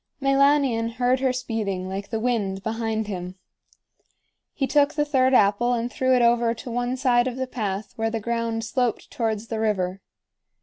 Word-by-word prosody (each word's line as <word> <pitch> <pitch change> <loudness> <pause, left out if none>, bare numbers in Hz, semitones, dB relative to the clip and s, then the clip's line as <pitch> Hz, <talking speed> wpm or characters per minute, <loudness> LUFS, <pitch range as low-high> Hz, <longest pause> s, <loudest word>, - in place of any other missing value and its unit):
Meilanion 275 -4 +3
heard 250 +1 +1
her 265 -1 +2
speeding 215 -7 -3
like 195 +1 -5
the 225 - -2
wind 210 -5 -1
behind 220 0 -2
him. 180 -3 -6 1.2
He 275 - 0
took 290 +1 +2
the 295 -1 +1
third 260 -2 +3
apple 210 +3 +3
and 240 0 -2
threw 260 0 +2
it 245 - +3
over 235 0 +3
to 235 +2 -8
one 245 +2 -1
side 250 -2 +3
of 250 - -3
the 260 - -1
path 210 -5 -4
where 225 0 0
the 225 0 -2
ground 230 0 -2
sloped 240 0 -1
towards 225 -4 -2
the 225 - -3
river. 195 -3 -1
230 Hz, 175 wpm, -24 LUFS, 215-255 Hz, 1.2 s, Meilanion